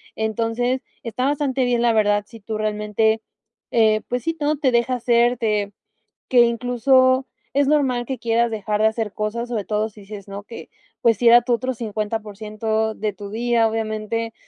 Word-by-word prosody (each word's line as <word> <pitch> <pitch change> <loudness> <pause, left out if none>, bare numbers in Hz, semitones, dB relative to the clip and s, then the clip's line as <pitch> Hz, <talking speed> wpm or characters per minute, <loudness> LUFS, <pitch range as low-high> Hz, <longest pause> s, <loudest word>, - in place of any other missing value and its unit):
Entonces, 230 +3 -1 0.2
está 245 +2 -2
bastante 275 -2 0
bien, 240 -1 +1
la 240 - +4
verdad, 205 -1 +2
si 230 +1 -13
tú 215 +1 -5
realmente, 215 +1 0 0.5
eh, 220 -2 +3
pues 245 -1 -2
sí, 330 - 0
todo 305 -1 0
te 280 -3 +1
deja 235 +1 +1
hacer 240 0 +2
de 210 -3 0 0.6
que 250 - +5
incluso 255 +2 +3 0.3
es 280 0 +2
normal 265 -5 +2
que 265 -2 -4
quieras 235 0 +1
dejar 210 -1 -2
de 220 - +5
hacer 220 -2 -3
cosas, 225 +3 -3
sobre 225 -4 -2
todo, 210 +2 -1
si 210 -1 -16
dices 200 0 -10
no 200 0 -7
que, 230 +3 -10 0.3
pues 230 -4 +3
si 240 - +4
era 240 +1 +8
tu 245 - -1
otro 255 +2 0
50% 220 0 -3
de 215 -1 -2
tu 200 +1 -9
día, 230 +1 +2
obviamente, 220 +1 -3
225 Hz, 180 wpm, -22 LUFS, 215-245 Hz, 0.6 s, era